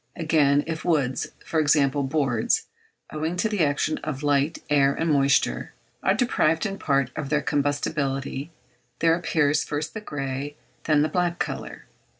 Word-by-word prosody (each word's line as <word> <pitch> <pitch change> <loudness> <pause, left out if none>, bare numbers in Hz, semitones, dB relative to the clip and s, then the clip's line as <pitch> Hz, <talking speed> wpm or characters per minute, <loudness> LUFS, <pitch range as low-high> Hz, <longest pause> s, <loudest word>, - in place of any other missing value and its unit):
Again, 150 -3 +3
if 160 -1 -4
woods 145 -7 0 0.2
for 160 - 0
example, 145 -2 +3
boards, 135 -5 +1 0.5
owing 160 +3 -2
to 180 +5 +1
the 210 -6 +1
action 145 +1 0
of 150 -2 -5
light, 145 +1 +2
air, 140 -2 +3
and 165 -1 0
moisture, 140 -1 +2 0.3
are 190 - +2
deprived 165 -9 +1
in 195 -1 -3
part 140 -3 +1
of 150 -3 -4
their 150 0 +1
combustibility, 145 -2 -1 0.5
there 165 -1 +3
appears 155 -3 +1
first 150 +2 -4
the 220 - -5
grey 140 -4 -4 0.3
then 150 -2 +3
the - - +2
black 175 +1 0
colour. - - -5
150 Hz, 150 wpm, -25 LUFS, 140-160 Hz, 0.5 s, Again